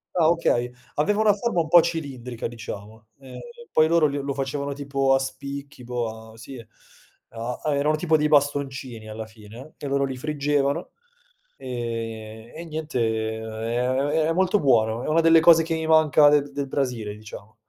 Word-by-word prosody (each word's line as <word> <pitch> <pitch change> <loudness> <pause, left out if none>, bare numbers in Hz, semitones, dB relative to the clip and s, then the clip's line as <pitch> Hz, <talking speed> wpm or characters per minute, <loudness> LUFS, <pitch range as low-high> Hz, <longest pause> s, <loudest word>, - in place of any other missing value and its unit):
Ah, 165 -3 +4
okay, 125 -8 +1 0.2
aveva 205 +8 +1
una 215 -1 +5
forma 205 -4 0
un 160 - -4
po' 175 +1 +7
cilindrica, 135 -8 -4
diciamo, 110 -1 -9
ehm, 135 -2 -11 0.3
poi 155 0 +4
loro 165 -2 +4
le 145 0 -3
lo 140 0 -3
facevano 140 +1 -3
tipo 135 -1 0
a 135 - +4
spicchi, 140 0 -7
boh, 110 -2 -5
sì, 115 +4 -10 0.7
a 115 +2 -5 0.2
erano 150 +2 +2
tipo 160 -1 +2
dei 150 - +1
bastoncini 135 -6 0
alla 110 +1 -6
fine, 110 +6 -13
e 145 - -6
loro 140 0 +1
li 130 -1 -5
friggevano, 145 +2 -1 0.7
ehm, 115 -3 -6
e 170 - -7
niente, 155 -4 -4 0.4
è 115 +2 -3
è 140 +5 +1
è - - +1
molto 190 +3 +2
buono, 115 - +2
è - - -5
una 160 +2 +3
delle 165 0 +6
cose 165 0 +7
che 165 0 -2
mi 160 0 -3
manca 155 -2 +5
del 145 -1 +2
del 140 -1 -4
Brasile, 125 -7 -2
diciamo. 105 0 -12
140 Hz, 170 wpm, -24 LUFS, 115-155 Hz, 0.7 s, po